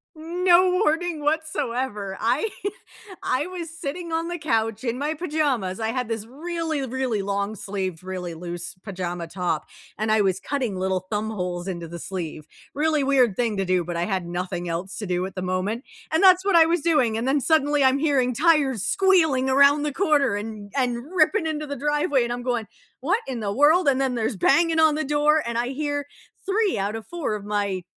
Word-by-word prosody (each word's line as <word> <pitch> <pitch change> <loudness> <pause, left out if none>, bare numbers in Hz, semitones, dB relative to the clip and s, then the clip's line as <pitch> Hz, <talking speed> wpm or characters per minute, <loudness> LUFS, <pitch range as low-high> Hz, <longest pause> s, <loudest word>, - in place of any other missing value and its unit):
No 350 +3 +3
warning 330 -1 0
whatsoever. 260 -10 -2
I 255 - +1 0.7
I 265 +4 0
was 355 -2 -6
sitting 330 +1 -6
on 330 +1 -1
the 345 0 -4
couch 225 -6 0
in 240 -1 -1
my 295 +3 -1
pajamas. 290 - -1
I 220 - -1
had 250 0 -2
this 225 -2 -3
really, 320 +3 -3
really 250 -4 -1
long 200 +2 -2
sleeved, 190 -4 -4
really 180 -2 -5
loose 175 +1 -6
pajama 180 -4 -4
top, 175 -2 -2 0.3
and 215 0 0
I 220 - +4
was 190 -2 +1
cutting 255 -4 -2
little 185 0 -1
thumb 215 +1 -1
holes 180 -3 -4
into 170 -3 -4
the 170 +1 -8
sleeve. 160 -5 -6 0.3
Really 305 0 +1
weird 255 -7 +3
thing 230 -4 0
to 195 - 0
do, 180 -1 +1
but 175 - -4
I 170 +1 0
had 190 -4 -2
nothing 175 0 -4
else 175 +4 -4
to 210 - -4
do 180 0 -1
at 190 - -12
the 185 - -4
moment, 185 +6 -2 0.3
and 320 +4 +2
that's 370 0 +7
what 395 -3 +2
I 330 - +8
was 335 -1 +1
doing, 285 -9 +2
and 230 +3 -2
then 280 +2 +3
suddenly 290 0 +2
I'm 265 +1 +4
hearing 270 -5 +2
tires 280 - +3
squealing 330 -9 +3
around 280 +2 +5
the 295 -2 -2
corner 290 - +2
and 205 -1 -6
and 245 -3 0
ripping 340 +3 +3
into 305 -1 -3
the 285 - -4
driveway, 295 -2 +1
and 240 - -2
I'm 245 0 -5
going, 240 -3 -1 0.3
"What 350 - +1
in 250 -4 -4
the 200 -1 -2
world?" 295 - +4
And 270 -1 +3
then 265 -2 0
there's 225 0 -1
banging 320 - +3
on 315 -1 +5
the 310 -1 -1
door, 295 +2 +3
and 235 0 -3
I 240 +1 0
hear 290 +1 -3 0.4
3 395 - +1
out 200 +2 -1
of 225 - -7
4 335 -11 -3
of 205 - -7
my 200 -3 -1
255 Hz, 200 wpm, -24 LUFS, 200-305 Hz, 0.7 s, I